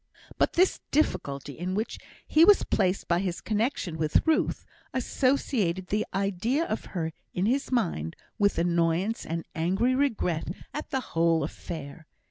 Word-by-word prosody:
But -, -, +3 dB
this 365 Hz, +2 st, +3 dB
difficulty 145 Hz, -, 0 dB
in 180 Hz, +2 st, -2 dB
which 220 Hz, +3 st, -2 dB, 0.3 s
he 315 Hz, -, +5 dB
was 410 Hz, +3 st, +7 dB
placed 190 Hz, -1 st, 0 dB
by 170 Hz, 0 st, +2 dB
his 180 Hz, -2 st, -2 dB
connexion 215 Hz, -, -1 dB
with 155 Hz, -1 st, +2 dB
Ruth, 320 Hz, -1 st, +1 dB, 0.3 s
associated 240 Hz, -9 st, 0 dB
the 215 Hz, +1 st, 0 dB
idea 200 Hz, -, 0 dB
of 220 Hz, -, -3 dB
her 160 Hz, -1 st, -2 dB, 0.2 s
in 180 Hz, -, +1 dB
his 265 Hz, +6 st, 0 dB
mind 165 Hz, -, 0 dB, 0.2 s
with 200 Hz, -1 st, +3 dB
annoyance 170 Hz, +5 st, +1 dB
and 165 Hz, +1 st, -3 dB
angry 190 Hz, +10 st, +1 dB
regret 225 Hz, -, 0 dB, 0.3 s
at 300 Hz, -, -5 dB
the 265 Hz, -3 st, -1 dB
whole 165 Hz, -1 st, +3 dB
affair. 155 Hz, 0 st, -7 dB
190 Hz, 145 wpm, -28 LUFS, 165-250 Hz, 0.3 s, was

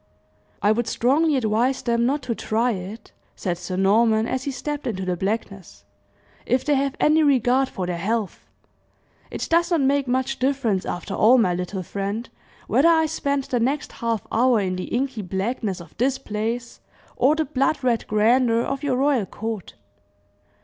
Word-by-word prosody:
"I 205 Hz, -, +5 dB
would 230 Hz, +1 st, 0 dB
strongly 285 Hz, +7 st, +2 dB
advise 245 Hz, +2 st, +1 dB
them 235 Hz, 0 st, +1 dB
not 280 Hz, +1 st, -1 dB
to 245 Hz, -, -2 dB
try 230 Hz, +2 st, 0 dB
it," 200 Hz, +2 st, -7 dB, 0.2 s
said 175 Hz, -3 st, -3 dB
Sir 180 Hz, +1 st, -5 dB
Norman, 220 Hz, +3 st, +3 dB
as 260 Hz, +1 st, -3 dB
he -, -, -1 dB
stepped 285 Hz, +2 st, -4 dB
into 190 Hz, -5 st, -3 dB
the 180 Hz, -1 st, -1 dB
blackness, 195 Hz, -, -4 dB, 0.6 s
"if 255 Hz, +1 st, +1 dB
they 300 Hz, -, +2 dB
have 275 Hz, 0 st, 0 dB
any 310 Hz, +1 st, +4 dB
regard 265 Hz, -2 st, +3 dB
for 185 Hz, -, -4 dB
their 175 Hz, -1 st, -3 dB
health! 215 Hz, +1 st, -2 dB, 0.8 s
It -, -, -4 dB
does 340 Hz, +1 st, +2 dB
not 335 Hz, -4 st, +2 dB
make 275 Hz, 0 st, +2 dB
much 260 Hz, +2 st, -1 dB
difference 255 Hz, -8 st, 0 dB
after 175 Hz, +3 st, -4 dB
all, 235 Hz, +6 st, +5 dB
my 185 Hz, -7 st, +3 dB
little 180 Hz, +2 st, -4 dB
friend, 200 Hz, +6 st, -4 dB, 0.4 s
whether 320 Hz, +5 st, +4 dB
I 320 Hz, -1 st, +4 dB
spend 280 Hz, -3 st, -1 dB
the 250 Hz, -2 st, -1 dB
next 275 Hz, +5 st, -1 dB
half 230 Hz, -2 st, -3 dB
hour 245 Hz, 0 st, +3 dB
in 185 Hz, -2 st, -1 dB
the 185 Hz, -, -4 dB
inky 255 Hz, -2 st, -2 dB
blackness 195 Hz, +1 st, -3 dB
of 170 Hz, -, -13 dB
this 260 Hz, +3 st, +1 dB
place 230 Hz, 0 st, -4 dB, 0.4 s
or 280 Hz, +5 st, +3 dB
the 315 Hz, 0 st, 0 dB
blood 275 Hz, +1 st, 0 dB
red 240 Hz, -3 st, 0 dB
grandeur 230 Hz, +2 st, +3 dB
of 275 Hz, 0 st, -3 dB
your 285 Hz, -4 st, 0 dB
royal 265 Hz, -7 st, +2 dB
court. 220 Hz, -2 st, -6 dB
235 Hz, 175 wpm, -23 LUFS, 210-270 Hz, 0.8 s, I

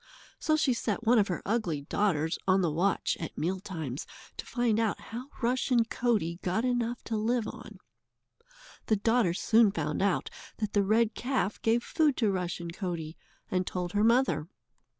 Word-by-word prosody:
So 310 Hz, -, +2 dB
she 290 Hz, -4 st, +2 dB
set 225 Hz, -2 st, -2 dB
one 235 Hz, +1 st, +5 dB
of 205 Hz, -, +3 dB
her 180 Hz, -, -3 dB
ugly 190 Hz, -9 st, 0 dB
daughters 160 Hz, 0 st, 0 dB
on 190 Hz, 0 st, +4 dB
the 165 Hz, -, +1 dB
watch 180 Hz, +6 st, +1 dB
at 160 Hz, -, -6 dB
meal 185 Hz, +4 st, -1 dB
times 160 Hz, -8 st, -5 dB, 0.3 s
to -, -, -7 dB
find 235 Hz, -3 st, +1 dB
out 225 Hz, -2 st, 0 dB
how 240 Hz, +4 st, -7 dB, 0.2 s
Rushen 245 Hz, -1 st, +2 dB
Coatie 205 Hz, -9 st, 0 dB
got 185 Hz, +7 st, 0 dB
enough 240 Hz, -1 st, -1 dB
to 225 Hz, -, -3 dB
live 225 Hz, +1 st, 0 dB
on. -, -, -9 dB, 1.1 s
The 220 Hz, -, +4 dB
daughter 220 Hz, -4 st, +2 dB
soon 225 Hz, +1 st, +4 dB
found 150 Hz, -4 st, -2 dB
out 200 Hz, -1 st, +1 dB, 0.3 s
that 215 Hz, -2 st, -3 dB
the 205 Hz, -, +4 dB
red 220 Hz, +3 st, +2 dB
calf 250 Hz, -5 st, -1 dB
gave 230 Hz, +1 st, +2 dB
food 305 Hz, -4 st, +1 dB
to 220 Hz, -4 st, +2 dB
Rushen 175 Hz, -2 st, -3 dB
Coatie, 170 Hz, -4 st, -4 dB, 0.4 s
and 185 Hz, -1 st, 0 dB
told 180 Hz, -1 st, -3 dB
her 205 Hz, +2 st, +1 dB
mother. 225 Hz, -, +3 dB
210 Hz, 170 wpm, -29 LUFS, 175-235 Hz, 1.1 s, one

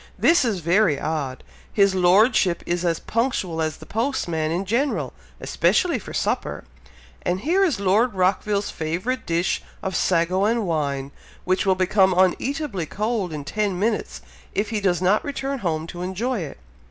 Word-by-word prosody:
"This 335 Hz, -3 st, +4 dB
is 215 Hz, -7 st, -1 dB
very 170 Hz, -3 st, +3 dB
odd! 140 Hz, -5 st, -3 dB, 0.3 s
His 200 Hz, -2 st, +3 dB
Lordship 185 Hz, 0 st, +3 dB
is 175 Hz, 0 st, -1 dB
as 170 Hz, -2 st, +1 dB
punctual 220 Hz, -9 st, -1 dB
as 155 Hz, -2 st, -2 dB
the -, -, -12 dB
postman 190 Hz, -, -1 dB
in 180 Hz, +4 st, -1 dB
general! 220 Hz, -, 0 dB, 0.3 s
especially -, -, +1 dB
for -, -, -10 dB
supper; -, -, -2 dB, 0.6 s
and 180 Hz, +2 st, -1 dB
here 355 Hz, -, +2 dB
is 315 Hz, -, +1 dB
Lord 205 Hz, +4 st, +2 dB
Rockville's 200 Hz, +2 st, +1 dB
favourite 180 Hz, +11 st, -3 dB
dish 170 Hz, +3 st, 0 dB, 0.2 s
of 190 Hz, -1 st, -2 dB
sago 180 Hz, +2 st, +2 dB
and 225 Hz, 0 st, +1 dB
wine, 140 Hz, -5 st, -2 dB, 0.3 s
which 185 Hz, +2 st, 0 dB
will 190 Hz, -, +4 dB
become 190 Hz, 0 st, +3 dB
uneatably 195 Hz, -, 0 dB
cold 210 Hz, -2 st, -2 dB
in 150 Hz, -2 st, -5 dB
ten 205 Hz, +3 st, -1 dB
minutes, 215 Hz, +3 st, -1 dB, 0.3 s
if 210 Hz, +3 st, -1 dB
he 215 Hz, -2 st, -1 dB
does 185 Hz, -2 st, +1 dB
not 195 Hz, +4 st, +3 dB
return 275 Hz, -1 st, -3 dB
home 160 Hz, -6 st, -2 dB
to 175 Hz, +1 st, -8 dB
enjoy 210 Hz, +7 st, -2 dB
it!" 160 Hz, -5 st, -6 dB
190 Hz, 160 wpm, -23 LUFS, 170-220 Hz, 0.6 s, This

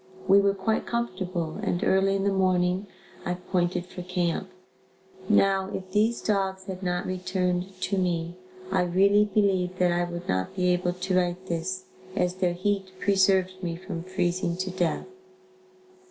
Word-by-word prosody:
We 195 Hz, +1 st, +7 dB
were 200 Hz, 0 st, +2 dB
quite 210 Hz, +3 st, -1 dB
comfortable 185 Hz, -7 st, -2 dB
and 185 Hz, -4 st, -1 dB
early 195 Hz, +1 st, +3 dB
in 195 Hz, -, 0 dB
the 200 Hz, -, +2 dB
morning, 185 Hz, 0 st, +2 dB, 0.4 s
I 180 Hz, -, -1 dB
pointed 180 Hz, -1 st, -1 dB
for 180 Hz, 0 st, -8 dB
camp. 180 Hz, 0 st, -1 dB, 0.8 s
Now 195 Hz, -2 st, +3 dB
if 185 Hz, 0 st, -7 dB
these 220 Hz, +4 st, +2 dB
dogs 190 Hz, -2 st, 0 dB
had 190 Hz, -1 st, -6 dB
not 180 Hz, -1 st, -1 dB
returned 185 Hz, 0 st, -2 dB
to 195 Hz, 0 st, 0 dB
me, 175 Hz, -1 st, -1 dB, 0.4 s
I -, -, +3 dB
really 195 Hz, +4 st, +4 dB
believe 190 Hz, -3 st, +1 dB
that 180 Hz, -1 st, +3 dB
I 175 Hz, 0 st, +1 dB
would 175 Hz, 0 st, -6 dB
not 95 Hz, -, -1 dB
be 180 Hz, -1 st, +2 dB
able 180 Hz, 0 st, +1 dB
to 185 Hz, +1 st, -2 dB
write 180 Hz, 0 st, 0 dB
this, 185 Hz, +2 st, -3 dB, 0.3 s
as 180 Hz, -2 st, +1 dB
their 180 Hz, -2 st, +1 dB
heat 190 Hz, +1 st, -1 dB
preserved 190 Hz, -1 st, +2 dB
me 170 Hz, -2 st, -2 dB
from 180 Hz, -1 st, -6 dB
freezing 180 Hz, -1 st, -1 dB
to 185 Hz, 0 st, -2 dB
death. 175 Hz, -3 st, -1 dB
185 Hz, 160 wpm, -27 LUFS, 180-195 Hz, 0.8 s, We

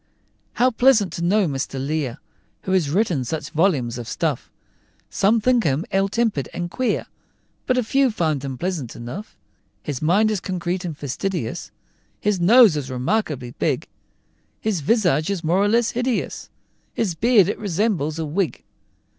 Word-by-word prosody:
"How 255 Hz, +1 st, +3 dB
pleasant 230 Hz, -5 st, +3 dB
to -, -, -5 dB
know 200 Hz, +3 st, +3 dB
Mr. 135 Hz, -3 st, -3 dB
Lear!" 140 Hz, -3 st, -2 dB, 0.5 s
Who 190 Hz, -, -3 dB
has 180 Hz, -6 st, +2 dB
written 175 Hz, -, +1 dB
such 150 Hz, +3 st, -4 dB
volumes 145 Hz, -9 st, +1 dB
of 120 Hz, -, -7 dB
stuff! -, -, -2 dB, 0.6 s
Some 210 Hz, +4 st, +3 dB
think 245 Hz, +1 st, +2 dB
him 145 Hz, +3 st, 0 dB
ill 195 Hz, +1 st, +2 dB
tempered 210 Hz, -, 0 dB
and 175 Hz, 0 st, -4 dB
queer, 255 Hz, -1 st, -1 dB, 0.6 s
But 255 Hz, -, +2 dB
a 250 Hz, -, +2 dB
few 270 Hz, +4 st, +2 dB
think 160 Hz, -, -1 dB
him 135 Hz, -2 st, -4 dB
pleasant 165 Hz, -7 st, -3 dB
enough. 125 Hz, -, -8 dB, 0.5 s
His 145 Hz, -5 st, -4 dB
mind 200 Hz, +8 st, +3 dB
is 210 Hz, -, -1 dB
concrete 180 Hz, 0 st, -3 dB
and 165 Hz, -5 st, -5 dB
fastidious, 150 Hz, -, -3 dB, 0.5 s
His 205 Hz, -2 st, 0 dB
nose 215 Hz, +1 st, +7 dB
is 140 Hz, -3 st, -3 dB
remarkably 130 Hz, -, -1 dB
big; -, -, 0 dB, 0.7 s
His 210 Hz, -7 st, -1 dB
visage 170 Hz, -, +2 dB
is 195 Hz, -4 st, -2 dB
more 170 Hz, +4 st, +2 dB
or 205 Hz, -, +3 dB
less 230 Hz, +2 st, +2 dB
hideous, 245 Hz, 0 st, -2 dB, 0.5 s
His 205 Hz, -6 st, 0 dB
beard 215 Hz, +1 st, +4 dB
it 205 Hz, -, -2 dB
resembles 185 Hz, -6 st, -1 dB
a 160 Hz, -, -2 dB
wig. 165 Hz, +3 st, -2 dB
180 Hz, 160 wpm, -22 LUFS, 150-215 Hz, 0.7 s, nose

